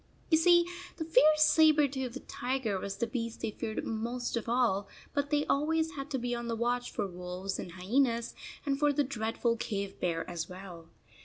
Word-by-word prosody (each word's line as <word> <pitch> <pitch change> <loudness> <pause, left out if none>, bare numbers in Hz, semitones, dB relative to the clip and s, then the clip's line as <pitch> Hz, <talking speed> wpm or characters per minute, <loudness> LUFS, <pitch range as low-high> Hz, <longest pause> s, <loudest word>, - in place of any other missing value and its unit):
You 315 - +7
see, 345 +1 +6 0.3
the 320 - -3
fierce 310 0 +5
saber 310 -2 +6
toothed 265 -1 -5
tiger 245 -6 -1
was 195 +1 -5
the 235 - 0
beast 230 -1 -4
they - - -1
feared 220 +1 -4
most 235 +3 -2
of 230 0 -3
all, 230 -5 +2 0.3
but 285 0 0
they 295 0 +2
always 320 +3 +1
had 275 -2 -6
to 275 - -1
be 245 -1 -2
on 235 0 -3
the 230 - -1
watch 245 +2 0
for - - -2
wolves 180 +1 -5
and 175 - -6
hyenas, 235 +6 +1 0.3
and 275 -1 0
for 295 0 +4
the 285 +1 +2
dreadful 230 -2 -1
cave 200 -3 -4
bear 165 -2 -1
as 170 -2 -4
well. 180 -3 -10
240 Hz, 190 wpm, -31 LUFS, 200-285 Hz, 0.3 s, You